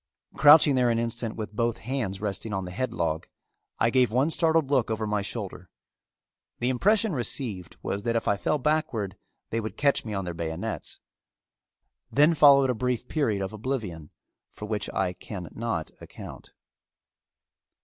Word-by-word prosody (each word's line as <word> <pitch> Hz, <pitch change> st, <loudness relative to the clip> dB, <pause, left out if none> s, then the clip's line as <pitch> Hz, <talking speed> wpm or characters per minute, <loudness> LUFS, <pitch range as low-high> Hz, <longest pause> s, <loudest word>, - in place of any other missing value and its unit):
Crouching 150 Hz, 0 st, +7 dB
there 125 Hz, -2 st, +3 dB
an 115 Hz, -, +2 dB
instant 115 Hz, -1 st, -3 dB
with 105 Hz, -1 st, -6 dB
both 115 Hz, +1 st, 0 dB
hands 115 Hz, -6 st, -3 dB
resting 105 Hz, +1 st, -3 dB
on 95 Hz, -1 st, -2 dB
the 90 Hz, -, -7 dB
headlog, 85 Hz, -7 st, -2 dB, 0.5 s
I 115 Hz, -, +2 dB
gave 125 Hz, -2 st, +3 dB
one 135 Hz, +7 st, +2 dB
startled 160 Hz, -4 st, +2 dB
look 130 Hz, -6 st, +2 dB
over 110 Hz, 0 st, -1 dB
my 105 Hz, -1 st, 0 dB
shoulder. 100 Hz, -4 st, -6 dB, 0.9 s
The 120 Hz, -, 0 dB
impression 205 Hz, -, +2 dB
received 120 Hz, -, -3 dB
was 100 Hz, -, -2 dB
that 115 Hz, +2 st, -1 dB
if 115 Hz, -, -1 dB
I 100 Hz, -, +3 dB
fell 150 Hz, +9 st, 0 dB
backward 125 Hz, -9 st, -1 dB, 0.4 s
they 115 Hz, -, 0 dB
would 110 Hz, -1 st, -5 dB
catch 140 Hz, -1 st, +2 dB
me 110 Hz, -2 st, -5 dB
on 95 Hz, -1 st, -2 dB
their 85 Hz, -, -4 dB
bayonets. 80 Hz, -1 st, -4 dB, 1.1 s
Then 150 Hz, +4 st, +5 dB
followed 140 Hz, -3 st, +6 dB
a -, -, 0 dB
brief 125 Hz, +1 st, -2 dB
period 110 Hz, -11 st, 0 dB
of 95 Hz, -, -5 dB
oblivion 105 Hz, -, -4 dB, 0.4 s
for 105 Hz, -, -8 dB
which 105 Hz, -1 st, -3 dB
I 95 Hz, -2 st, -1 dB
can 90 Hz, -2 st, -8 dB
not 115 Hz, -9 st, -3 dB
account. -, -, -11 dB
115 Hz, 160 wpm, -27 LUFS, 100-130 Hz, 1.1 s, Crouching